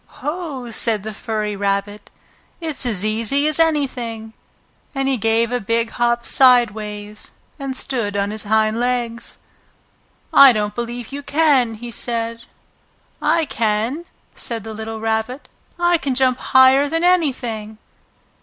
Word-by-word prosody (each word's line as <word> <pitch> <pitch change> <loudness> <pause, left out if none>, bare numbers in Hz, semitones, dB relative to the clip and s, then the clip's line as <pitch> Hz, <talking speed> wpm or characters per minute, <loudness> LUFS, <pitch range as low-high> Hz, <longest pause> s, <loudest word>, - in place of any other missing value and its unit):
"Ho!" 295 -7 -4
said 220 -2 -1
the 220 0 -5
furry 210 -1 -3
rabbit. 200 +1 -2 0.5
"It's 315 -6 -2
as 210 -4 0
easy 230 +7 +1
as 310 +1 +3
anything," 250 -8 -1 0.6
And 270 0 0
he 270 - +2
gave 225 +1 +1
a 245 - 0
big 230 +3 -1
hop 235 0 0
sideways 215 -5 +2 0.3
and 270 -1 -4
stood 230 -8 -2
on 200 +1 0
his 215 -1 -4
hind 220 +1 +2
legs. 240 -1 -2 1.0
"I 275 -2 +9
don't 210 -1 -2
believe 240 +1 -5
you 285 +1 -5
can!" 280 -6 +2
he 240 +2 -8
said. 230 0 -3 0.7
"I 320 +2 +2
can!" 230 +7 -1 0.3
said 230 -3 -4
the 220 0 -7
little 220 +1 -6
Rabbit. 225 +4 -2 0.3
"I 345 -1 +2
can 270 -2 -2
jump 255 -1 +2
higher 260 +2 +5
than 330 +2 -1
anything!" 245 -12 0
235 Hz, 135 wpm, -20 LUFS, 220-270 Hz, 1.0 s, I